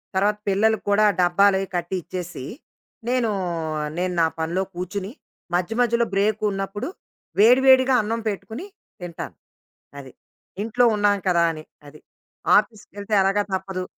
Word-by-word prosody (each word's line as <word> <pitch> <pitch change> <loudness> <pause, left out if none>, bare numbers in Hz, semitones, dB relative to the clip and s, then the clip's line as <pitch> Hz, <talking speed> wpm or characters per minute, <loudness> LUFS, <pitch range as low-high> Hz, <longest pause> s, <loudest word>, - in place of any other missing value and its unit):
తర్వాత 205 +2 +2
పిల్లలకి 220 +3 +2
కూడా 210 +1 +4 0.2
డబ్బాలవి 195 +2 +3
కట్టి 175 +2 -2
ఇచ్చేసి, 175 -5 -7 0.6
నేనూ 245 -3 +1 0.7
నేను 180 0 -1
నా - - +5
పనిలో 170 +4 -1
కూర్చుని 185 +3 -4 0.4
మధ్యమధ్యలో 235 +5 +1
బ్రేకున్నప్పుడు 205 0 -1 0.5
వేడి 245 +5 +6
వేడిగా 260 0 +6
అన్నం 225 +2 -2
పెట్టుకుని 215 - -6 0.4
తింటాను. 175 -2 -7 0.6
అది. 135 -2 -10 0.5
ఇంట్లో 245 +2 +2
ఉన్నాం 205 -1 +2
కదా! 170 -2 +3
అని. 155 -1 -9 0.2
అది. 150 +1 -15 0.6
ఆఫీసుకెళ్తే 205 -1 -2
ఎలాగా 195 +2 +2
తప్పదు. 190 -1 -3
200 Hz, 115 wpm, -23 LUFS, 180-220 Hz, 0.7 s, వేడి